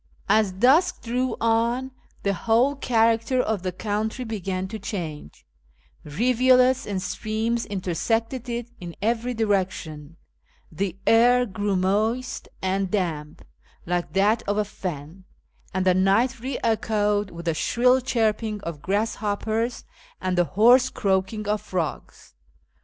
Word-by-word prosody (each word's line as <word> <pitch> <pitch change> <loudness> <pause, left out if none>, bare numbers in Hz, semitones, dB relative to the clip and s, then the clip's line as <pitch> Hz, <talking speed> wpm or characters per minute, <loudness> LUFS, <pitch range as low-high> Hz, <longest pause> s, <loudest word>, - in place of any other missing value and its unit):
As 210 -1 +3
dusk 255 - +3
drew 250 +2 -1
on 235 +3 +1 0.3
the 200 - +1
whole 235 +8 +2
character 230 -1 +2
of 220 -5 0
the 185 0 -2
country 215 +6 -3
began 190 -4 -3
to 220 +1 -6
change: 165 - -6 0.6
rivulets 255 - +3
and 200 -2 -2
streams 220 +4 -2
intersected 225 - -2
it 235 0 -4
in 175 -2 -8
every 235 +3 -1
direction; 185 -8 -2 0.5
the 185 +2 -3
air 245 +2 +5
grew 205 -1 -2
moist 215 +7 0 0.2
and 190 0 0
damp, 160 -7 -3 0.4
like 175 0 -2
that 210 +4 +3
of 205 +1 0
a 210 - +1
fen; 180 -2 -7 0.5
and 185 0 -1
the 185 - +5
night 200 +8 +2
re 255 +2 -4
echoed 210 -2 +1
with 170 -1 -9
the 165 - +1
shrill 250 +9 +2
chirping 220 -3 0
of 165 -5 -6
grasshopj^ers 215 +4 -1 0.4
and 185 -1 -1
the 175 -1 +3
hoarse 245 +8 +5
croaking 195 +1 -1
of 210 0 0
frogs. 180 -6 -5
210 Hz, 130 wpm, -24 LUFS, 185-235 Hz, 0.6 s, air